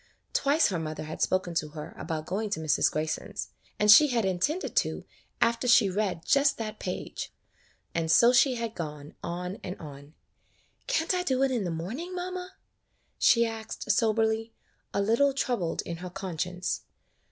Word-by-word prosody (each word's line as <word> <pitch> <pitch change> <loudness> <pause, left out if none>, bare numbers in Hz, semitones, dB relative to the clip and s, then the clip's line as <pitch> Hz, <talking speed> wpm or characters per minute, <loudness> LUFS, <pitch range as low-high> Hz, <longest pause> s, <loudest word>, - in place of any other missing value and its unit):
Twice 285 +2 +3
her 180 -4 -1
mother 155 -1 -4
had 155 +1 -7
spoken 185 -2 +1
to 155 -2 0
her 150 - -7
about 160 -2 -4
going 205 +5 -2
to 200 - -2
Mrs. 155 -3 +2
Grayson's, 155 +1 -3 0.3
and 210 0 +6
she 300 +8 +9
had 235 -6 +1
intended 190 - -1
to - - 0 0.3
after 235 +2 +2
she 235 -5 +6
read 190 -4 -1
just 280 0 +3
that 215 -1 -5
page; 180 - -5 0.6
and 165 -1 -1
so 235 +8 +6
she 255 +1 +5
had 230 -2 -3
gone 150 -4 -6
on 180 +3 -4
and 180 - -5
on. 145 -1 -11 0.7
"Can't 375 -9 +1
I 365 - +1
do 265 -6 +1
it 270 - +2
in 235 -6 0
the - - -1
morning, 230 - -5
mamma?" 365 +1 -5 0.6
she 235 -1 +5
asked, 225 -1 -3
soberly, 220 +1 +1 0.4
a 200 - 0
little 235 +7 +3
troubled 240 -11 -1
in 170 - -5
her 180 +1 -7
con 185 -3 -6
science. 180 +1 -2
210 Hz, 170 wpm, -28 LUFS, 170-245 Hz, 0.7 s, she